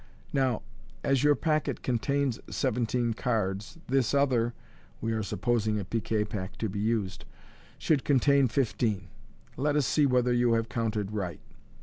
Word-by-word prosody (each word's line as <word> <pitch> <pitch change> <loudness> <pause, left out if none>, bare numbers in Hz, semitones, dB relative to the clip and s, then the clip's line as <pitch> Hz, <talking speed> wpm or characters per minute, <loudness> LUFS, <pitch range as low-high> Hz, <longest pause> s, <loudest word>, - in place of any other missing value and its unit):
Now, 130 -4 +1 0.4
as 135 -1 +2
your 145 0 +5
packet 155 +1 0
contains 135 +1 0
seventeen 120 -2 0
cards, 105 - -2
this 135 0 +1
other 125 -4 +2 0.2
" - - -29
(we 115 - -2
are 110 -1 0
supposing 110 0 0
a 100 - -4
piquet 110 0 -1
pack 100 -3 -5
to 110 - -1
be 100 +1 -4
used) 105 -3 -1 0.3
" - - -25
should 150 -5 +1
contain 140 0 +4
fifteen. 115 -5 0 0.5
Let 145 +3 +1
us 150 -3 +3
see 150 +2 +3
whether 125 -1 +2
you 120 -1 +3
have 115 0 0
counted 110 -3 -1
right." 95 -5 -3
120 Hz, 155 wpm, -29 LUFS, 110-135 Hz, 0.5 s, your